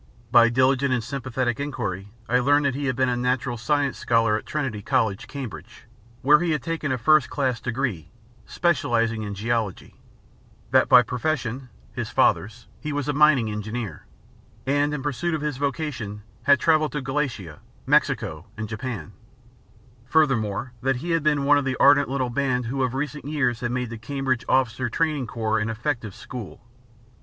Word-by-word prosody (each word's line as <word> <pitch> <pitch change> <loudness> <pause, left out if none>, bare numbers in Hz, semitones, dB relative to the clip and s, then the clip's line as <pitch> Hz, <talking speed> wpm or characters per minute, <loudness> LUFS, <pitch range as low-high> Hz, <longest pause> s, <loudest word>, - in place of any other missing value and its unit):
By 120 -1 +7
diligent 130 +2 +2
and 125 -3 +1
sympathetic 130 -1 -2
enquiry 105 -9 -4 0.2
I 125 +1 +3
learned 145 +3 +3
that 140 - +2
he 140 +2 -3
had 130 -2 0
been 130 +1 +2
a 125 - +1
Natural 125 0 -1
Science 140 +3 0
scholar 115 -2 +2
at 110 - -5
Trinity 135 -9 -3
College, 110 -4 0
Cambridge, 135 -7 -8 0.4
where 150 +3 +6
he 175 0 -1
had 150 -4 -2
taken 165 -4 -2
a 130 - 0
first 150 +3 +4
class 130 -5 -1
degree 120 - -3 0.4
specialising 115 -9 +1
in 105 -1 -5
geology; 110 -2 -3 0.7
that 130 0 +4
by 125 -1 +8
profession 125 0 -3 0.2
(his - - -4
father's) 115 +4 +1
he 150 - -4
was 145 -1 -2
a 145 - 0
mining 140 -7 +4
engineer, 105 -3 -5 0.6
and, 145 +2 +1
in 150 -3 -4
pursuit 160 +4 -1
of 155 - -4
his 150 -3 -2
vocation, 135 -8 -3 0.2
had 140 +2 +4
travelled 155 -2 +2
in 145 - -2
Galicia, 125 - -3 0.3
Mexico - - +1
and 110 0 -4
Japan; 115 -1 -5 0.9
furthermore, 125 -6 +1
that 135 +1 +1
he 165 +8 -4
had 165 0 +2
been 150 -1 +2
one 145 +1 +5
of - - -3
the 130 -1 -2
ardent 140 -1 +5
little 130 -2 -1
band 125 -1 0
who 135 +4 -2
of 130 0 0
recent 150 +1 -4
years 135 -6 0
had 120 - -2
made 125 -1 -2
the 115 - -7
Cambridge 130 0 -2
Officers 130 -1 +1
Training 150 -2 0
Corps 110 -1 -1
an 115 0 -1
effective 115 -3 -3
school. 120 -6 -8
130 Hz, 170 wpm, -24 LUFS, 115-145 Hz, 0.9 s, by